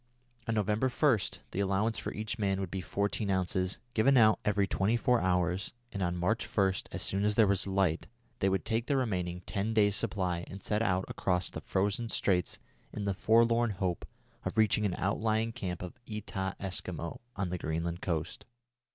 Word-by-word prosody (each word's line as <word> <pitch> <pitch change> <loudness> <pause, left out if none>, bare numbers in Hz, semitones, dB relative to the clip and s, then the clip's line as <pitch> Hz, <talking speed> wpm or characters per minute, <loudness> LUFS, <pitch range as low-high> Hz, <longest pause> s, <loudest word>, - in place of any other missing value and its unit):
On 115 - 0
November 105 +4 +1
1, 130 -2 +3 0.3
the - - -3
allowance 100 +3 +1
for - - -4
each 110 +1 -4
man 95 -2 +1
would 95 -3 -3
be 95 - -3
fourteen 100 +2 -1
ounces, 95 0 0 0.2
given 130 +5 +4
out 110 -2 +6
every 105 -2 +2
twenty 100 +4 +1
four 125 -1 +2
hours, 90 0 0 0.2
and 100 - -4
on 90 -1 0
March 105 +6 +1
1, 95 -2 +2 0.2
as - - -4
soon 95 +1 0
as 105 0 +2
there 110 - +6
was 100 0 +2
light, 95 -4 +1 0.3
they 95 - +3
would 95 -1 0
take 115 +2 -1
their 140 - +2
remaining 90 -8 -1
ten 105 +3 -2
days' 105 -2 +4
supply 90 -5 0
and 95 +2 -9
set 105 +1 0
out 95 -3 +1
across 90 -1 0
the - - -6
frozen 105 +4 0
straits 90 -5 +1 0.3
in 105 - -4
the 100 -1 0
forlorn 115 +3 +4
hope 95 -4 -2 0.4
of - - -4
reaching 110 -1 +4
an 90 - -2
outlying 110 +3 0
camp 95 -7 -4
of 90 - -8
Etah 100 -3 -3
Eskimo 90 -3 -3 0.2
on 95 -2 -2
the 90 0 -3
Greenland 85 +2 -2
coast. 80 -4 -3
100 Hz, 185 wpm, -31 LUFS, 90-110 Hz, 0.4 s, out